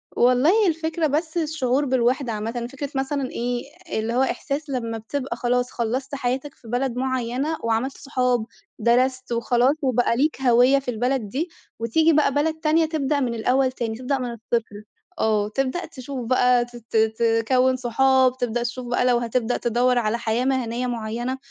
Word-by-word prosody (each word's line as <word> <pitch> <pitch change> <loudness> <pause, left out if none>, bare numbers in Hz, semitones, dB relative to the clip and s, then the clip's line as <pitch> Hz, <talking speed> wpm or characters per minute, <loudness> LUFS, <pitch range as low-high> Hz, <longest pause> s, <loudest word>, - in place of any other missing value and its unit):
والله 290 - +4
الفكرة 325 -1 0
بس 315 +3 -1
الشُّعور 295 -4 0
بالوحدة 255 -1 +1
عامَّةً، 230 +3 -3
فكرة 280 +1 -5
مثلًا 270 0 -1
إيه، 240 0 -2 0.4
اللي 225 +2 -2
هو 250 - +2
إحساس 280 +3 -2
لمّا 230 -4 -2
بتبقى 255 +3 -4
خلاص 245 +1 0
خلَّصت 255 +4 -2
حياتك 270 +2 -2
في 235 - -17
بلد 245 +1 -1
مُعيَّنة، 260 +4 -1
وعملت 230 +4 -1
صحاب، 250 -4 0 0.3
درست 255 +3 +1
وخلاص 240 +3 +2
وبقى 250 -3 +2
ليك 295 +1 +1
هويَّة 250 +2 +5
في 265 -2 -4
البلد 245 -1 -1
دي، 310 - -2 0.3
وتيجي 315 +9 +3
بقى 290 -2 +3
بلد 305 +3 +1
تانية 320 +1 +3
تبدأ 300 -2 0
من 250 -4 -1
الأول 255 +3 +2
تاني، 230 -3 -3
تبدأ 255 +3 -1
من 250 -2 -3
الصِّفر، 225 -2 -3 0.4
آه، 210 -1 +1
تبدأ 270 +9 -2
تشوف 265 -4 -7
بقى 250 0 +3
ت 240 0 -16
ت 230 -1 -4
ت 220 +1 +2 0.2
تكوّن 260 0 +3
صحاب، 260 +1 +3
تبدأ 240 -1 -1
تشوف 245 +1 -5
بقى 245 +1 +1
لو 250 -1 +4
هتبدأ 240 0 -1
تدوَّر 245 +2 +1
على 230 -1 +1
حياة 235 +1 -1
مهنيَّة 250 -2 -1
مُعيَّنة، 240 +2 -3
250 Hz, 165 wpm, -23 LUFS, 235-275 Hz, 0.4 s, هويَّة